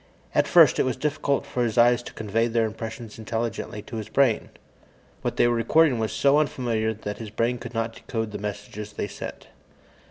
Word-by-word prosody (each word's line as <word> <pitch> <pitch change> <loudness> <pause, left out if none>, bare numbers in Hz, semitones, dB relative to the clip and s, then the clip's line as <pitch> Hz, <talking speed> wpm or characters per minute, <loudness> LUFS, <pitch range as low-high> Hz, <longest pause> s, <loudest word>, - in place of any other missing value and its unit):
At - - +3
first, - - +6
it - - +5
was 130 - 0
difficult 150 -2 0
for 125 - -1
his 115 -1 -1
eyes 120 0 +5
to - - -10
convey 110 +2 0
their 115 -1 +1
impressions 110 +1 -6
intelligently 110 -2 -3
to 120 -5 -7
his 110 0 -5
brain. 130 -3 +2 0.7
What - - -3
they - - +5
were 120 - +2
recording 130 +3 +3
was 110 -1 -1
so 140 +1 +4
unfamiliar 120 -7 0
that 105 -1 -6
his 110 -2 -6
brain 115 +3 0
could 120 - -8
not 115 0 -1
decode 110 -3 -4
the - - -5
messages 105 +1 -6
they 105 - -3
sent. - - -8
115 Hz, 195 wpm, -25 LUFS, 110-120 Hz, 0.7 s, first